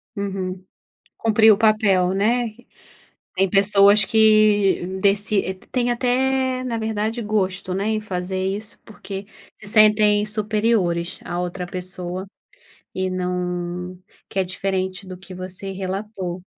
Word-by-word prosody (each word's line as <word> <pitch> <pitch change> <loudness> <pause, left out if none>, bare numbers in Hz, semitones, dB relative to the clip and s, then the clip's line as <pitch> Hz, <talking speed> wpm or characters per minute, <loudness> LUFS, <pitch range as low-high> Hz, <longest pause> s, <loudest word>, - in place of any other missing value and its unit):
Uhum. 190 -2 -4 0.6
Cumpriu 220 -1 +5
o - - -6
papel, 210 -5 +3
né. 225 +3 0 0.8
Tem 195 +1 +2
pessoas 200 +1 +5
que, 215 -3 +4
deci 200 0 +2
t 185 - -21
têm 245 -1 0
até, 255 +1 0
na 235 -2 -2
verdade, 220 +1 -2
gosto, 195 -3 -1
né, 195 +2 -2
em 220 -1 0
fazer 185 -2 -3
isso 205 +3 -4
porque 200 -2 -8 0.3
se 215 - -10
sentem 210 -1 +5
superiores 210 -5 0
à 175 - -4
outra 180 0 -4
pessoa, 180 0 -5 0.7
e 185 0 -1
não 180 0 -3 0.3
que - - -8
é - - +3
diferente 185 +1 -3
do 185 -1 -8
que 190 0 -12
você 185 +1 -7
relatou. 190 -1 -5
195 Hz, 125 wpm, -22 LUFS, 185-215 Hz, 0.8 s, Cumpriu